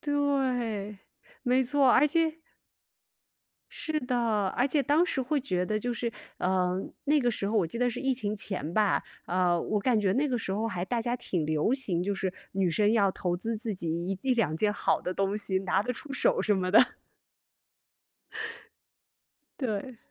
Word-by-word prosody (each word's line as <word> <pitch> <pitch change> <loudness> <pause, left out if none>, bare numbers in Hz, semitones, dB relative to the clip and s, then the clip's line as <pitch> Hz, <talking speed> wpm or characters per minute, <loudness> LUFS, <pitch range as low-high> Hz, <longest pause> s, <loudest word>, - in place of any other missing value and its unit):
对， 255 -8 0 0.4
没 255 0 +3
错， 270 +1 +3
而 290 - +6
且 325 +1 +1 1.3
是 315 -1 -2
的。 235 -6 0
而 250 - +3
且 285 0 +1
当 295 +5 +3
时 330 -7 -1
会 275 +3 0
觉 180 -9 -1
得 215 - 0
就 245 +3 -2
是 235 0 -2 0.3
呃， 185 0 +1 0.3
那 295 +1 +4
个 245 -2 +2
时 200 -3 -3
候 220 - 0
我 185 -6 +3
记 200 - -6
得 245 0 +2
是 - - -5
疫 270 -1 +1
情 210 -4 -2
前 190 -6 -4
吧， 210 -2 +3 0.2
呃， 175 -1 +2
我 210 -1 -1
感 240 0 +2
觉 195 -2 +2
那 275 +8 +2
个 250 -4 0
时 190 - -3
候 215 +3 -1
还 180 -5 -2
大 235 +4 -1
家 240 +1 -1
挺 175 -9 -2
流 155 +8 +1
行， 190 -11 -1
就 200 +2 -1
是 190 -1 -2 0.2
女 190 -2 +1
生 205 +5 +3
要 200 -4 +4
投 180 -2 -2
资 225 +5 -3
自 220 -1 -3
己 170 -3 -4 0.2
一 190 0 -2
一 265 -1 +2
两 210 -10 +1
件 205 +4 +2
好 - - +1
的 180 - -3
东 195 +2 0
西， 195 -2 0
拿 190 +1 +1
得 250 - -2
出 275 +3 -8
手 275 - +2
什 210 - +2
么 185 -1 -1
的。 205 - +5 2.6
对。 240 -1 -3
215 Hz, 205 characters per minute, -29 LUFS, 190-255 Hz, 2.6 s, 而